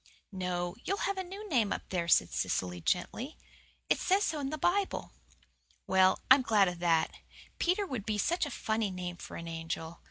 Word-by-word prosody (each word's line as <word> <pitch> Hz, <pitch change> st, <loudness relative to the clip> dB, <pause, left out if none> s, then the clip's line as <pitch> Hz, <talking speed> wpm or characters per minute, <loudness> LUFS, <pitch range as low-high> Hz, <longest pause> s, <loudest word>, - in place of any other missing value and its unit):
"No. 180 Hz, -2 st, -2 dB
You'll 395 Hz, +1 st, -1 dB
have 395 Hz, -1 st, -1 dB
a -, -, -1 dB
new 395 Hz, +4 st, -8 dB
name 235 Hz, -, +2 dB
up -, -, -4 dB
there," 175 Hz, -2 st, -1 dB
said 90 Hz, -, +4 dB
Cecily 90 Hz, -1 st, -1 dB
gently. 230 Hz, -, -1 dB, 0.5 s
"It -, -, +2 dB
says 390 Hz, +2 st, +3 dB
so 310 Hz, -, -1 dB
in 275 Hz, -1 st, -2 dB
the 310 Hz, -, -3 dB
Bible." 380 Hz, +6 st, 0 dB, 0.7 s
"Well, 190 Hz, 0 st, +4 dB
I'm 265 Hz, +1 st, +9 dB
glad 215 Hz, -5 st, +4 dB
of 175 Hz, -1 st, -3 dB
that. 165 Hz, -2 st, +2 dB, 0.5 s
Peter 370 Hz, +4 st, +2 dB
would 250 Hz, -, -5 dB
be 215 Hz, -1 st, 0 dB
such 330 Hz, -, +1 dB
a -, -, -5 dB
funny 220 Hz, -5 st, -1 dB
name 180 Hz, -1 st, -5 dB
for -, -, -9 dB
an 170 Hz, -, -7 dB
angel. 165 Hz, 0 st, -5 dB
210 Hz, 190 wpm, -31 LUFS, -, 0.7 s, I'm